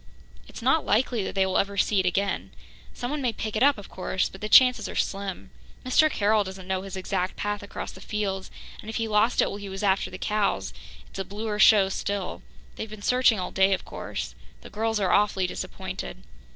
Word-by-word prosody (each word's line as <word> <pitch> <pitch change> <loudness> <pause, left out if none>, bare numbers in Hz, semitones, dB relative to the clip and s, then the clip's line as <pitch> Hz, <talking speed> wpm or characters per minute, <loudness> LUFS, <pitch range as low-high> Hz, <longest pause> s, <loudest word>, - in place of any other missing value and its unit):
It's - - -10
not 270 +6 +3
likely 225 +1 +1
that - - -5
they 190 -1 +3
will 190 0 +1
ever 200 0 -1
see 200 0 +3
it 185 - +1
again. 195 +2 -1 0.4
Someone 280 +4 -4
may 250 -3 +1
pick 220 -1 -5
it 215 - 0
up, 280 +1 +5
of 205 - -9
course, 185 0 -2
but 190 - -13
the 210 - -3
chances 250 +2 +6
are - - -7
slim. 195 -2 -3 0.3
Mr. 310 +5 +4
Carroll 210 -4 +2
doesn't 190 -1 -9
know 190 -1 -1
his 190 -1 -7
exact 185 -1 -2
path 205 0 -2
across 205 - -6
the 190 - -13
fields, 195 -2 -3 0.3
and 215 - -9
if 220 - -5
he 225 -1 -1
lost 215 +3 +3
it - - 0
while 200 - -5
he 200 -1 -7
was 195 +1 -5
after 195 -1 +2
the 185 - -8
cows, 210 0 -1 0.3
it's - - -10
a - - 0
bluer 210 +2 -4
show 205 -1 +7
still. 195 0 -3 0.4
They've 220 - -5
been 210 -1 -10
searching 250 -3 +4
all 180 - -4
day, 190 0 +4
of 190 - -2
course. - - -5 0.3
The - - -12
girls 225 0 0
are 190 -3 +1
awfully 195 -2 +3
disappointed." 60 - -6
205 Hz, 220 wpm, -26 LUFS, 190-220 Hz, 0.4 s, show